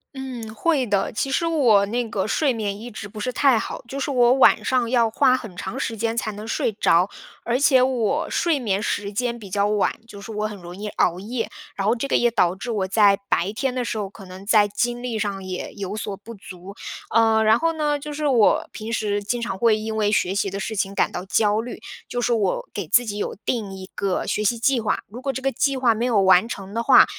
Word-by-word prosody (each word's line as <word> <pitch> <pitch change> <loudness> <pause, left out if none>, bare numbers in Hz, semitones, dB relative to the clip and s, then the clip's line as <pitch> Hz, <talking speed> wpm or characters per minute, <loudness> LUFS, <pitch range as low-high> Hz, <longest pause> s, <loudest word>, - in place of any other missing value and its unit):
嗯， 245 -5 -7
会 275 +2 +1
的。 200 -2 0
其 270 - -1
实 270 +5 0
我 250 -12 +4
那 235 +3 -2
个 195 -2 -1
睡 275 +6 +1
眠 205 -4 -3
一 240 - -7
直 215 -2 -8
不 210 +1 -10
是 250 +4 -2
太 255 -2 +3
好， - - -6
就 270 +3 -5
是 275 - -2
我 245 -2 +4
晚 265 - +5
上 250 -3 +1
要 235 -2 +3
花 255 +3 +3
很 220 -8 -9
长 190 +2 -5
时 225 - -2
间 225 +1 -2
才 220 - -1
能 210 +1 -8
睡 225 - 0
着。 180 -2 +3 0.4
而 240 +2 0
且 275 -2 +5
我 260 +3 +1
睡 335 -4 +1
眠 205 -5 -1
时 205 -1 -2
间 240 +2 -1
比 210 -4 -11
较 200 +1 +2
晚， 210 -1 +1
就 205 -3 -11
是 210 - -8
我 210 0 -2
很 210 -1 -8
容 175 -1 -10
易 205 +2 -6
熬 180 -3 +1
夜。 225 +4 -4 0.3
然 195 0 -2
后 225 - +3
这 245 +3 -3
个 - - 0
也 240 0 +3
导 180 -5 +2
致 235 +5 -5
我 200 -4 -1
在 200 0 +4
白 185 +4 +1
天 265 +3 -1
的 250 -1 -2
时 220 - -3
候， 200 -2 -3
可 195 0 -13
能 185 +1 -11
在 210 -2 +5
精 240 +4 -2
力 235 -3 -2
上 200 -2 -3
也 185 -1 -5
有 200 -1 -5
所 205 -2 -4
不 230 +4 -11
足。 190 -1 -11 0.4
呃， 225 -1 +4
然 220 +2 +4
后 330 0 +1
呢， 300 -2 0
就 300 +1 -7
是 300 +1 -3
我 240 -6 +3
平 220 +1 -7
时 205 -2 -1
经 240 +4 -2
常 230 -4 -3
会 230 -2 +4
因 220 0 -4
为 210 -1 +1
学 190 -3 +1
习 200 0 0
的 195 +1 -5
事 220 +2 -4
情 195 0 -2
感 - - +1
到 180 - -5
焦 210 +2 +2
虑。 240 +2 -7 0.3
就 245 - -3
是 240 0 +1
我 205 -5 0
给 200 -5 -4
自 245 +9 +4
己 205 -2 -4
有 - - -3
定 215 -6 -2
一 190 -1 -8
个 195 -2 -1
学 210 - -1
习 235 +3 +1
计 245 +1 +2
划， 215 - -1
如 235 +5 -10
果 275 - -1
这 265 - -5
个 270 - +1
计 275 -1 0
划 250 -3 +3
没 220 +2 -3
有 235 -5 +2
完 190 +2 +5
成 195 -3 -7
的 230 - -1
话， 235 - +7
220 Hz, 270 characters per minute, -23 LUFS, 200-245 Hz, 0.4 s, 话